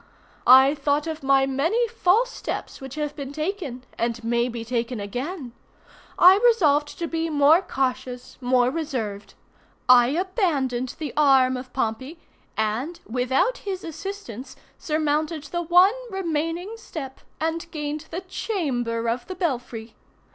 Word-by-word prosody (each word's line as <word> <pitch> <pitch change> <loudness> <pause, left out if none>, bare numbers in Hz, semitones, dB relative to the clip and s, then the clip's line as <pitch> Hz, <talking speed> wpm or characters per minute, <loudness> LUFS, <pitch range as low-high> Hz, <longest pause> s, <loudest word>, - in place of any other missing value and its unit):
I 265 +2 +8
thought 290 0 0
of 320 -1 -4
my 270 0 +4
many 325 - +1
false 460 +2 +2
steps - - -6
which 265 0 -8
have 300 -1 -3
been 275 -2 -6
taken, 305 -5 -4 0.2
and 235 0 -1
may 235 +1 +1
be 230 -1 -6
taken 240 0 -2
again. 250 - -5 0.7
I 370 +2 +8
resolved 300 -11 +3
to 340 - -2
be 330 0 -2
more 300 +3 +5
cautious, 255 -5 -3
more 250 0 +3
reserved. 250 -10 -4 0.5
I 245 -1 +7
abandoned 290 - -1
the 305 -3 -5
arm 270 -3 +4
of 255 0 -7
Pompey, 260 +6 -3 0.4
and, 235 +11 -1
without 260 - +1
his 385 -2 -5
assistance, 315 - -7 0.2
surmounted 310 0 -1
the 345 +4 -3
one 355 +4 +5 0.2
remaining 345 +2 -3
step, 280 -11 -8 0.2
and 325 +1 -2
gained 300 0 -5
the 345 +3 -4
chamber 260 - -2
of 240 +1 -2
the 370 - -6
belfry. 245 - -3
290 Hz, 135 wpm, -24 LUFS, 250-335 Hz, 0.7 s, I